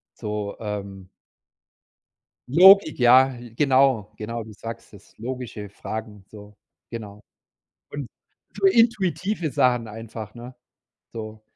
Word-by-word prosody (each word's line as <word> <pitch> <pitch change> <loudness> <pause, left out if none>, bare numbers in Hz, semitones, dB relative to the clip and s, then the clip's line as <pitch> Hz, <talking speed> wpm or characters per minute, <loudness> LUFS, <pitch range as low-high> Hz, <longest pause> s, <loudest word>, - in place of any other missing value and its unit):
so, 105 -2 -4
ähm 100 -3 -6 1.4
Logik, 185 +3 +7
ja, 130 +2 +6 0.2
genau, 130 -5 +2
genau, 115 +2 -5
du 110 0 -11
sagst 115 +2 -9
es 100 - -18
logische 120 -3 -6
Fragen, 105 0 -7
so 105 -1 -14 0.3
genau. 105 -3 -8 0.7
Und 140 -4 -6 0.5
so - - -4
intuitive 195 - +2
Sachen 125 -2 +1
einfach, 110 0 -8
ne? 120 +2 -10 0.6
So. 110 -1 -8
115 Hz, 105 wpm, -24 LUFS, 105-135 Hz, 1.4 s, Logik